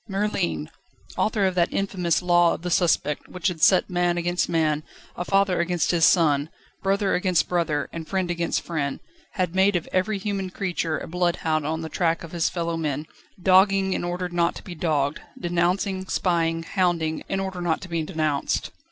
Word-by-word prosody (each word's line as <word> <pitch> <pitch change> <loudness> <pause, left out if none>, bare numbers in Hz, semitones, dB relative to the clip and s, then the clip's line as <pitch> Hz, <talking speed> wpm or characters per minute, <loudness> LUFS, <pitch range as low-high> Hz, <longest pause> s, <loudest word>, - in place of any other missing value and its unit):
Merlin! 190 - -1 0.5
Author 210 -2 +1
of 190 - +1
that 175 -1 +1
infamous 180 -4 0
Law 175 -1 +4
of - - -11
the 180 - -3
Suspect 165 -4 +1
which 180 +2 -1
had 165 -3 -7
set 185 +2 +5
man 175 -1 +1
against 175 +1 0
man, 155 -3 +1 0.3
a 175 - -3
father 195 0 +2
against 170 -1 +1
his 170 -2 +4
son, 150 -3 +3 0.3
brother 195 0 +1
against 180 -2 +2
brother, 160 -5 0
and 165 -1 -6
friend 185 -2 -1
against 170 -1 -1
friend, 145 -5 -2 0.3
had 180 -3 -1
made 190 +1 +3
of 170 - -1
every 205 +3 +1
human 195 -1 -3
creature 175 -4 -2
a - - -6
bloodhound 165 -3 0
on 160 +1 -2
the 160 - -4
track 165 0 0
of 165 - -9
his 170 -2 0
fellowmen, 165 -4 -2 0.3
dogging 190 +1 +4
in - - -2
order 175 +1 -2
not 175 -1 0
to - - -9
be 185 - -8
dogged, 150 -4 0 0.2
denouncing, 185 +2 0
spying, 165 -3 0
hounding, 165 -3 0
in 195 - -1
order 190 -2 -4
not 170 -2 0
to - - -8
be 170 -2 -1
denounced. 155 -2 -1
175 Hz, 180 wpm, -24 LUFS, 165-185 Hz, 0.5 s, set